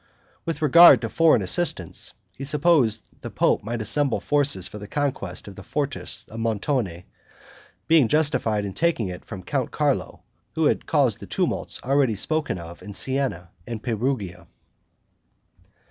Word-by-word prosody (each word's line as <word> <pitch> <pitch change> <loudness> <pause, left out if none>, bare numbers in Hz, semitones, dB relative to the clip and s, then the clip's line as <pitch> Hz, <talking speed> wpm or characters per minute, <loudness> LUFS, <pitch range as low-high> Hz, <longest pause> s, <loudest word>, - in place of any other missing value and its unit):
With 165 -1 -3
regard 170 +4 +8
to - - -3
foreign 165 -1 +4
assistance, 170 - -2 0.2
he 135 - -8
supposed 140 - +2 0.2
the - - -6
pope - - +1
might 115 +1 -3
assemble 145 +4 0
forces 145 -11 +1
for 105 - -9
the 105 - -9
conquest 130 -11 -3
of 100 - -9
the 95 - -10
fortress 140 +4 -3
of 110 - -8
Montone, 110 - -1 0.8
being 160 -6 +5
justified 130 -8 +1
in 100 - -5
taking 160 - 0
it 90 0 -8
from 95 -4 -8
Count - - -2
Carlo, - - -1 0.3
who - - +1
had - - +1
caused - - +2
the - - -10
tumults - - -2
already 135 -4 +2
spoken 155 - -1
of 85 0 -10
in 105 - -9
Sienna 130 -9 -1 0.2
and 115 -2 -6
Perugia. 110 -6 -2
120 Hz, 150 wpm, -24 LUFS, 100-145 Hz, 0.8 s, regard